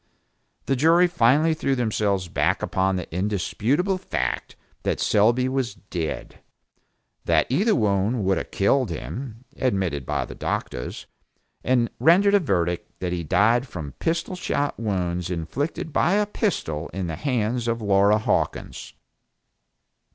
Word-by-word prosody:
The 135 Hz, -, +1 dB
jury 165 Hz, +6 st, +5 dB
finally 155 Hz, 0 st, +3 dB
threw 140 Hz, -4 st, 0 dB
themselves 105 Hz, -6 st, 0 dB
back 85 Hz, +3 st, 0 dB
upon 95 Hz, 0 st, +1 dB
the 90 Hz, -2 st, -4 dB
indisputable 110 Hz, -, 0 dB
fact 65 Hz, -, -3 dB, 0.3 s
that -, -, -1 dB
Selby 120 Hz, +5 st, +3 dB
was 130 Hz, -2 st, -2 dB
dead, 85 Hz, -5 st, -5 dB, 0.9 s
that 80 Hz, -2 st, +3 dB
either 205 Hz, -, +3 dB
wound 105 Hz, +1 st, +1 dB
would 95 Hz, 0 st, +2 dB
have -, -, -7 dB
killed 125 Hz, +6 st, +2 dB
him 125 Hz, -1 st, -6 dB
(admitted 95 Hz, -, -1 dB
by -, -, -1 dB
the -, -, -9 dB
doctors), -, -, -4 dB, 0.6 s
and 125 Hz, -2 st, +2 dB
rendered 180 Hz, -, +5 dB
a 205 Hz, -, +6 dB
verdict 90 Hz, -, -2 dB
that 90 Hz, -1 st, -2 dB
he 85 Hz, -1 st, -2 dB
died 110 Hz, -, +3 dB
from 80 Hz, -, -7 dB
pistol 170 Hz, +3 st, -1 dB
shot 145 Hz, -7 st, -2 dB
wounds 90 Hz, -5 st, -2 dB
inflicted 125 Hz, -, -3 dB
by 175 Hz, -, +3 dB
a 210 Hz, +1 st, +3 dB
pistol 125 Hz, -, -2 dB
in 95 Hz, 0 st, -3 dB
the 80 Hz, -2 st, -3 dB
hands 120 Hz, -, -1 dB
of 115 Hz, 0 st, 0 dB
Laura 100 Hz, 0 st, +4 dB
Hawkins. 110 Hz, -, -2 dB
110 Hz, 135 wpm, -24 LUFS, 95-135 Hz, 0.9 s, a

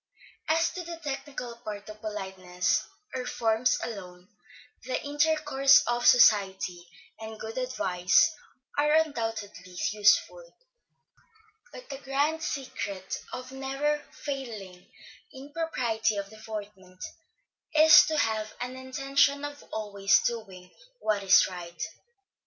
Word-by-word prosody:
As 325 Hz, +1 st, +2 dB
to 365 Hz, -, -6 dB
the 340 Hz, 0 st, -7 dB
technical 270 Hz, -4 st, -5 dB
part 210 Hz, -3 st, -7 dB
of 215 Hz, 0 st, -11 dB
politeness, 190 Hz, -4 st, -2 dB, 0.3 s
or 255 Hz, -, -3 dB
forms 225 Hz, +1 st, +1 dB
alone, 180 Hz, -4 st, -8 dB, 0.5 s
the 255 Hz, +2 st, -2 dB
intercourse 295 Hz, -2 st, +4 dB
of 240 Hz, 0 st, +1 dB
society, 190 Hz, -6 st, +4 dB, 0.3 s
and 220 Hz, 0 st, -8 dB
good 220 Hz, +1 st, -7 dB
advice, 185 Hz, -, +2 dB, 0.5 s
are 300 Hz, +1 st, +3 dB
undoubtedly 225 Hz, -, -1 dB
useful; 215 Hz, -, +2 dB, 1.1 s
but -, -, -11 dB
the 275 Hz, -, -6 dB
grand 285 Hz, +4 st, 0 dB
secret 205 Hz, -10 st, -4 dB
of 255 Hz, +1 st, -7 dB
never 275 Hz, +3 st, -2 dB
failing 220 Hz, -10 st, -7 dB, 0.5 s
in 275 Hz, +2 st, -11 dB
propriety 235 Hz, -10 st, -1 dB
of 200 Hz, 0 st, -5 dB
deportment, 205 Hz, -4 st, -9 dB, 0.7 s
is 315 Hz, +1 st, +9 dB
to 315 Hz, -, -1 dB
have 220 Hz, -4 st, -1 dB
an 250 Hz, +1 st, -5 dB
intention 275 Hz, +2 st, +1 dB
of 290 Hz, 0 st, -8 dB
always 200 Hz, -2 st, +2 dB
doing 195 Hz, -6 st, -4 dB, 0.3 s
what 210 Hz, -, 0 dB
is 195 Hz, -1 st, +6 dB
right. 170 Hz, -2 st, -7 dB
230 Hz, 110 wpm, -28 LUFS, 200-280 Hz, 1.1 s, is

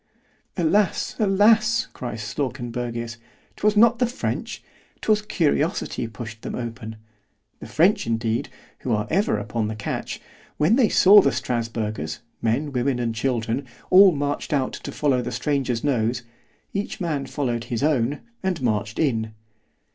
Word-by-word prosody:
Alas! 185 Hz, +3 st, +1 dB
alas! 215 Hz, +2 st, +4 dB
cries 115 Hz, -4 st, -5 dB
Slawkenbergius, 120 Hz, -2 st, -4 dB, 0.4 s
'twas 210 Hz, 0 st, +1 dB
not 235 Hz, +2 st, +5 dB
the 245 Hz, -, +3 dB
French,——'twas 220 Hz, -3 st, -3 dB
CURIOSITY 160 Hz, -, 0 dB
pushed 115 Hz, 0 st, -8 dB
them -, -, -5 dB
open——The 110 Hz, -3 st, -10 dB
French 180 Hz, -, +2 dB
indeed, 115 Hz, 0 st, -1 dB, 0.3 s
who 125 Hz, -, -2 dB
are 105 Hz, 0 st, 0 dB
ever 195 Hz, -, +2 dB
upon 105 Hz, +1 st, -2 dB
the 110 Hz, -, -4 dB
catch, 105 Hz, -, -4 dB, 0.4 s
when 160 Hz, +9 st, +4 dB
they 240 Hz, -5 st, +4 dB
saw 205 Hz, +2 st, +8 dB
the -, -, +2 dB
Strasburgers, 110 Hz, -8 st, -3 dB, 0.2 s
men, 130 Hz, +6 st, 0 dB
women 130 Hz, 0 st, 0 dB
and 120 Hz, -2 st, -1 dB
children, 120 Hz, +2 st, -1 dB, 0.2 s
all 190 Hz, +1 st, +9 dB
marched 145 Hz, -1 st, -2 dB
out 135 Hz, -3 st, 0 dB
to -, -, -6 dB
follow 135 Hz, -4 st, +1 dB
the 125 Hz, +1 st, -4 dB
stranger's 135 Hz, -5 st, -1 dB
nose——each 125 Hz, -, -3 dB
man 150 Hz, -7 st, -2 dB
followed 120 Hz, -5 st, -2 dB
his 120 Hz, +1 st, -3 dB
own, 145 Hz, -2 st, +1 dB, 0.2 s
and 190 Hz, -3 st, -1 dB
marched 110 Hz, -4 st, -1 dB
in. 110 Hz, -8 st, 0 dB
125 Hz, 130 wpm, -23 LUFS, 115-165 Hz, 0.4 s, all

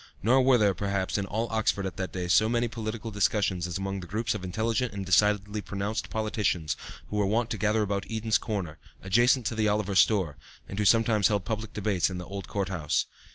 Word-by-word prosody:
Nor 130 Hz, +5 st, +5 dB
were 130 Hz, -1 st, +5 dB
there, 105 Hz, -3 st, +3 dB
perhaps, 100 Hz, 0 st, -1 dB
in 100 Hz, -, -3 dB
all 110 Hz, +4 st, -1 dB
Oxford 110 Hz, -3 st, 0 dB
at 95 Hz, -, -4 dB
that 95 Hz, -1 st, -3 dB
day 90 Hz, -1 st, -3 dB
so 110 Hz, +5 st, +4 dB
many 120 Hz, 0 st, +1 dB
political 110 Hz, 0 st, -5 dB
discussions 100 Hz, -3 st, +1 dB
as 90 Hz, -, -3 dB
among 95 Hz, 0 st, -3 dB
the 90 Hz, -, -8 dB
groups 110 Hz, +3 st, -1 dB
of 105 Hz, -3 st, -6 dB
intelligent 110 Hz, +5 st, -1 dB
and 100 Hz, -1 st, -4 dB
decidedly 105 Hz, +2 st, +2 dB
pronounced 100 Hz, +2 st, -3 dB
politicians 105 Hz, -7 st, -1 dB, 0.4 s
who 105 Hz, -, -2 dB
were 100 Hz, -1 st, +2 dB
wont 115 Hz, +3 st, 0 dB
to 110 Hz, -, -1 dB
gather 110 Hz, +2 st, +2 dB
about 100 Hz, -1 st, -2 dB
Eden's 110 Hz, -1 st, +1 dB
corner, 95 Hz, -9 st, -4 dB, 0.2 s
adjacent 120 Hz, +5 st, +3 dB
to -, -, -1 dB
the 110 Hz, -1 st, +1 dB
Oliver 105 Hz, -1 st, 0 dB
store, 95 Hz, -7 st, +3 dB, 0.3 s
and 100 Hz, -, -6 dB
who 105 Hz, -, +1 dB
sometimes 110 Hz, -1 st, +4 dB
held 100 Hz, -3 st, -1 dB
public 110 Hz, -1 st, -4 dB
debates 100 Hz, -4 st, +1 dB
in 90 Hz, -, -5 dB
the 90 Hz, -, -6 dB
old 100 Hz, +1 st, -7 dB
court 100 Hz, -2 st, -2 dB
house. 80 Hz, -6 st, 0 dB
105 Hz, 215 wpm, -28 LUFS, 95-110 Hz, 0.4 s, Nor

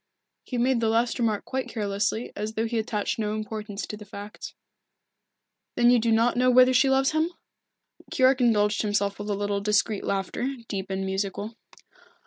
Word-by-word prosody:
He 250 Hz, -, -5 dB
made 245 Hz, +1 st, +2 dB
the 225 Hz, -1 st, +1 dB
last 230 Hz, +3 st, +1 dB
remark 220 Hz, -3 st, 0 dB
quite 265 Hz, 0 st, -3 dB
carelessly, 210 Hz, +1 st, -2 dB
as 210 Hz, +2 st, -4 dB
though 220 Hz, +1 st, -1 dB
he 230 Hz, 0 st, -1 dB
attached 215 Hz, -1 st, -2 dB
no 210 Hz, -1 st, -1 dB
importance 215 Hz, -1 st, -5 dB
to -, -, -6 dB
the 210 Hz, -, -11 dB
fact. 205 Hz, 0 st, -9 dB, 1.2 s
"Then 240 Hz, 0 st, +5 dB
you 245 Hz, -, +5 dB
do 230 Hz, 0 st, +1 dB
not 230 Hz, +2 st, +3 dB
know 250 Hz, +1 st, +3 dB
whether 255 Hz, +1 st, +6 dB
she 265 Hz, +2 st, +4 dB
loves 270 Hz, +2 st, +3 dB
him?" 315 Hz, +2 st, +1 dB, 0.8 s
Keyork 260 Hz, 0 st, +3 dB
indulged 210 Hz, -3 st, +3 dB
himself 205 Hz, -1 st, -1 dB
with 205 Hz, +1 st, -5 dB
a 205 Hz, -, 0 dB
little 205 Hz, 0 st, -1 dB
discreet 210 Hz, 0 st, +1 dB
laughter, 200 Hz, +7 st, -2 dB
deep 195 Hz, -2 st, -4 dB
and 190 Hz, 0 st, -2 dB
musical. 200 Hz, +3 st, -3 dB
220 Hz, 175 wpm, -26 LUFS, 205-245 Hz, 1.2 s, whether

